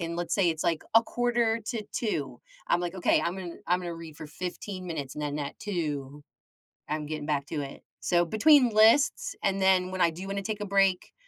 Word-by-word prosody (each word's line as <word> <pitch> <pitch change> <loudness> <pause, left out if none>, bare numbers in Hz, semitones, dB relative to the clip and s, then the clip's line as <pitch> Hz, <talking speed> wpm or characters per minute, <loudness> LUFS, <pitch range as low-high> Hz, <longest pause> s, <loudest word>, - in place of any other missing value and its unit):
and 170 0 -3
let's 170 -1 -2
say, 190 -4 +3
it's, 160 -1 -4
like, 165 -2 +1
a 225 - +9
quarter 235 -1 0
to 230 -4 -2
2:00, 145 - -2 0.3
I'm 175 - +2
like, 175 +1 -3
"Okay, 180 - +3
I'm 180 +3 -2
in 175 -2 -8
I'm 180 +1 +2
gonna 175 -1 -5
read 165 -2 -10
for 155 - -8
15 185 +4 -6
minutes, 145 -5 -5
and 150 - -5
then 145 0 -2
at 140 -1 -5
2:00, 150 -7 -4 0.7
I'm 150 0 -2
getting 150 -1 -5
back 145 -2 -1
to 150 -3 -3
it." 140 0 -8 0.2
So, 175 -1 +2
between 250 - +5
lists, 270 - +4
and 195 0 +1
then 185 -1 +3
when 185 -1 -3
I 170 - +5
do 180 +4 -8
wanna 200 0 -3
take 215 0 -3
a - - -2
break, 195 -2 +2
175 Hz, 220 wpm, -28 LUFS, 155-205 Hz, 0.7 s, a